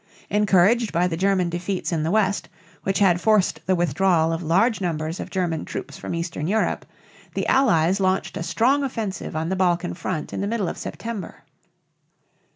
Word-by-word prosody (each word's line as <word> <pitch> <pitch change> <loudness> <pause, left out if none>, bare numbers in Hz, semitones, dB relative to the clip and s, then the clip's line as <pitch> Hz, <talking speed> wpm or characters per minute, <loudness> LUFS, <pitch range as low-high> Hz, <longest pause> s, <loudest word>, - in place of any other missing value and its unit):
Encouraged 210 +3 +3
by 170 +2 +2
the 175 -2 -1
German 190 0 +2
defeats 180 +3 -3
in 165 -2 0
the 155 - -1
west, 205 0 +1 0.3
which 195 0 -1
had 180 -3 +3
forced 210 -6 +3
the 185 - +3
withdrawal 170 0 +2
of 165 - -3
large 195 +8 +2
numbers 160 -1 -2
of - - -5
German 175 -4 -1
troops - - -6
from - - -5
eastern 165 -2 -3
Europe, 215 +4 0 0.5
the - - -1
Allies 195 -8 +3
launched 190 0 0
a - - -4
strong 250 +11 +2
offensive 220 - -4
on 160 +1 -1
the 190 - 0
Balkan 180 -1 +1
front 170 -2 -4
in - - -3
the 200 - -1
middle 215 -3 -1
of - - -6
September. 225 -6 -6
185 Hz, 175 wpm, -23 LUFS, 170-205 Hz, 0.5 s, Encouraged